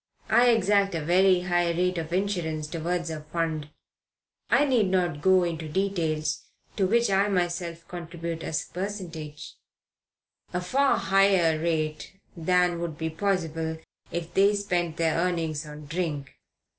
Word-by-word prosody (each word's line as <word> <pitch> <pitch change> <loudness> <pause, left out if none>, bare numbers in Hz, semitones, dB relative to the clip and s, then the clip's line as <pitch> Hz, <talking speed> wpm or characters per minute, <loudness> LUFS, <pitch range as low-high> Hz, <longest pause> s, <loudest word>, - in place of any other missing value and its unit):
I 245 0 +6
exact 200 -4 +3
a 155 -2 -3
very 185 +2 +4
high 175 -1 +1
rate 180 +1 0
of 160 0 -5
insurance, 175 -5 -1
towards 170 +2 -2
a 155 -1 -5
fund 155 -1 -3 0.8
I 290 - +4
need 245 -7 +3
not 175 -5 0
go 190 0 +5
into 165 -2 -3
details 160 -4 -1 0.3
to 195 -3 +3
which 235 +1 +2
I 195 +1 +3
myself 175 -3 -2
contribute 170 -1 -6
a - - -4 0.2
percentage 175 -6 -6 1.0
a 180 - 0
far 265 +10 +2
higher 190 -5 +3
rate 155 -1 -2 0.2
than 180 0 +2
would 170 -3 -4
be 160 -1 -3
possible 165 -3 -1 0.3
if 170 0 -4
they 200 +2 +4
spent 175 -5 -1
their 165 -1 +1
earnings 165 -3 -1
on 150 0 -9
drink. 150 -4 -3
175 Hz, 140 wpm, -27 LUFS, 160-190 Hz, 1.0 s, I